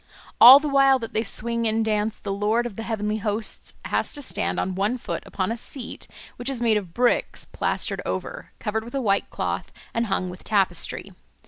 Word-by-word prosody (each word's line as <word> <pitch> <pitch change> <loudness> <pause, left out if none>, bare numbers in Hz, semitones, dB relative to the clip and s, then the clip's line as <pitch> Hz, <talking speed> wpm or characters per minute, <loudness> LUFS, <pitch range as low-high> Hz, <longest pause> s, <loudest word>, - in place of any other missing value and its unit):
All 255 +3 +12
the 300 - -3
while 275 -1 +5
that 225 -3 -7
they 220 - +1
swing 235 0 -1
and 220 0 +1
dance, 215 0 0
the 200 - -4
Lord 215 +4 +1
of 235 -5 -5
the 225 - -5
Heavenly 215 -2 -2
Hosts 215 +1 -3
has - - -1
to 290 - -3
stand 200 -3 -1
on 190 - -1
one 205 +6 0
foot - - -4
upon 190 +2 -2
a - - -1
seat 245 +1 -6 0.3
which 245 +2 -3
is 265 -3 -3
made 230 -2 +3
of 195 -5 -2
bricks 245 0 +1
plastered - - -2
over, - - -5
covered 220 0 -2
with 240 +4 -9
a - - +1
white 200 -4 +1
cloth, - - -3 0.2
and 230 0 0
hung 185 -2 -1
with 180 - -12
tapestry. 200 -3 0
220 Hz, 205 wpm, -24 LUFS, 210-240 Hz, 0.3 s, All